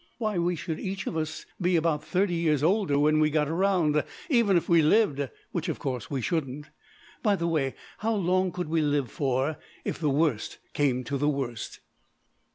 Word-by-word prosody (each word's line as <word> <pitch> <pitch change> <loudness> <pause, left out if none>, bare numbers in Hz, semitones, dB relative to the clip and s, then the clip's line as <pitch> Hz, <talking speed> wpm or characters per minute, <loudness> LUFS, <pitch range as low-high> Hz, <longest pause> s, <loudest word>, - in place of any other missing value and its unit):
Why, 215 -5 -1
we 175 +1 +1
should 160 0 -4
each 195 0 -4
of - - -3
us 160 0 -3 0.2
be 180 0 +2
about 160 -2 +1
thirty 190 0 +1
years 155 -4 +1
older 180 -4 +2
when 155 +1 +3
we 155 0 +4
got 150 -1 +1
round, 165 -3 +2 0.3
even 230 -8 +4
if 170 - -1
we 170 -1 +5
lived, 150 - +3 0.2
which, 170 0 -2
of 160 - -2
course, 125 -5 -4
we 135 -3 -2
shouldn't. 150 0 -2 0.6
By 210 -3 +3
the 170 -3 -1
way, 150 -5 0 0.2
how 225 +1 0
long 185 -1 +1
could 180 -1 -4
we 160 +1 +1
live 145 -5 0
for, 135 +2 0 0.3
if - - -3
the 155 -3 +1
worst 140 -5 0 0.2
came 130 -3 +1
to 140 +3 -3
the 145 +2 +2
worst?" 130 -6 -4
155 Hz, 190 wpm, -27 LUFS, 145-180 Hz, 0.6 s, we